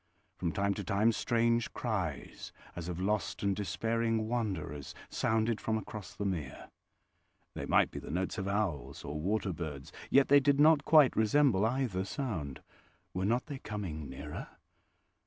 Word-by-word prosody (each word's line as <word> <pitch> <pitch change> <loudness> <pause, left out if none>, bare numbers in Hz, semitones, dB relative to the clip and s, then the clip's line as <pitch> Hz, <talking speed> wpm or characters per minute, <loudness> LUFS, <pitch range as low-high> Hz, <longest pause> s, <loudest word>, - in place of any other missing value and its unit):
From 85 -2 -2
time 100 +2 +1
to 100 - -5
time 100 +5 +3
strange 115 0 +1
cries 95 - -3 0.2
as 85 0 -5
of 90 0 -4
lost 100 +2 -1
and 100 -1 +2
despairing 115 +2 0
wanderers 95 - -3
sounded 110 0 +1
from 110 0 0
across 105 -2 -7
the 100 - -3
mere. 85 -8 -4 0.8
They - - -5
might - - +4
be - - -5
the - - -9
notes 95 +7 -2
of 95 - -3
owls 100 -7 -2
or 75 +2 -4
water 95 +1 0
birds, 75 -5 -6 0.2
yet 140 0 +5
they 145 +1 +7
did 140 0 +2
not 150 -1 +6
quite 150 -5 +6
resemble 110 -2 +4
either 120 -7 -1
sound. 95 - -4 0.5
Were 95 +1 -1
not 120 +4 +1
they 140 -3 -6
coming 85 - -5
nearer? 65 - -7
105 Hz, 155 wpm, -32 LUFS, 90-115 Hz, 0.8 s, they